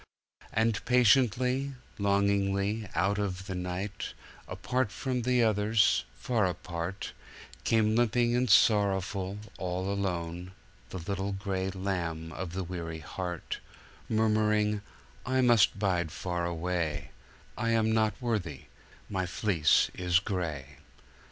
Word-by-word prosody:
And 110 -1 +1
patiently, 125 +2 +3 0.2
longingly, 100 +1 +1
out 95 +5 +1
of 95 -2 -2
the 95 - -4
night, 90 +3 -4 0.3
apart 125 -3 -1
from 130 0 -2
the 125 0 +3
others, 105 0 +3
far 115 -6 +1
apart, 90 +1 -4 0.5
Came 110 -1 +3
limping 120 +1 +2
and 125 0 +1
sorrowful, 100 -2 +3 0.2
all 95 +2 -2
alone, 90 -2 -3 0.4
the - - -6
little 100 +3 -3
gray 95 -1 -2
lamb 85 -4 -3
of 90 0 -5
the 95 +1 -2
weary 85 -2 -5
heart, 90 +1 -5 0.5
Murmuring, 105 -1 +2 0.4
"I 130 +1 +1
must 120 -5 +5
bide 90 -5 0
far 90 -1 -2
away: 85 -2 -2 0.4
I 115 - -1
am 110 -1 +3
not 110 -1 +1
worthy 100 - -2 0.5
my 95 -2 -2
fleece 90 -4 +3
is 90 -1 +2
gray." 80 -8 -3
100 Hz, 115 wpm, -30 LUFS, 90-110 Hz, 0.5 s, must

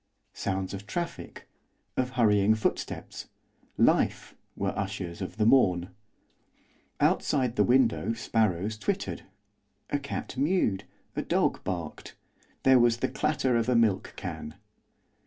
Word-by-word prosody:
Sounds 95 -1 -3
of 100 +1 -7
traffic, 170 +10 -5 0.5
of 130 -1 0
hurrying 105 -3 +4
footsteps, 110 - -3 0.5
life! - - +2 0.2
were - - -2
ushers 95 -3 -4
of 95 - -5
the 110 - +2
morn. 90 -8 +4 1.1
Outside 125 -4 +2
the - - +4
window 120 -2 +3
sparrows 110 -3 0
twittered, 100 - -2 0.7
a 145 - +1
cat 140 -2 -5
mewed, 135 - +1 0.3
a - - 0
dog - - 0
barked 85 -4 -5 0.5
there 130 -1 +6
was 120 -1 +4
the - - -1
clatter 135 -5 0
of 115 +1 +1
a 125 - +3
milk 110 -5 +2
can. 75 - -6
110 Hz, 120 wpm, -28 LUFS, 95-125 Hz, 1.1 s, there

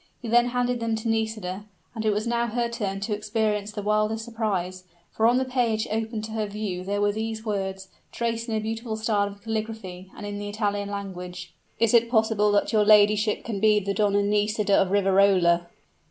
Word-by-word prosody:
He 240 - -7
then 240 +2 +4
handed 245 0 0
them 230 -1 -1
to 220 +1 -4
Nisida; 215 -3 -2 0.3
and 225 -2 -4
it 215 - +2
was 210 +2 -1
now 235 0 0
her 235 +1 -1
turn 200 -4 -3
to 210 +2 -2
experience 210 0 -1
the 210 -1 -5
wildest 215 +2 0
surprise 195 -6 -3 0.3
for 225 - +2
on 240 +1 +4
the 260 - +1
page 240 -4 0
opened 220 0 -2
to 220 - -6
her 220 -1 -2
view 200 -3 -4
were 205 +2 +1
these 220 +1 -4
words, 190 -2 -3 0.2
traced 230 0 -2
in 220 - -1
a - - +1
beautiful 220 +1 -4
style 215 -2 +1
of 200 0 -11
calligraphy, 215 -5 -5
and 210 - -7
in 205 0 -5
the 205 0 -5
Italian 205 -1 -2
language: 180 -3 -7 0.3
"Is 230 0 +3
it 235 0 +5
possible 220 -3 +2
that 205 - +1
your 215 -1 +4
ladyship 210 0 +4
can 220 -4 -3
be 215 0 +4
the 200 0 -2
Donna 205 -1 +2
Nisida 210 0 +1
of 195 -1 +4
Riverola?" 190 -3 +3
215 Hz, 195 wpm, -25 LUFS, 200-225 Hz, 0.3 s, it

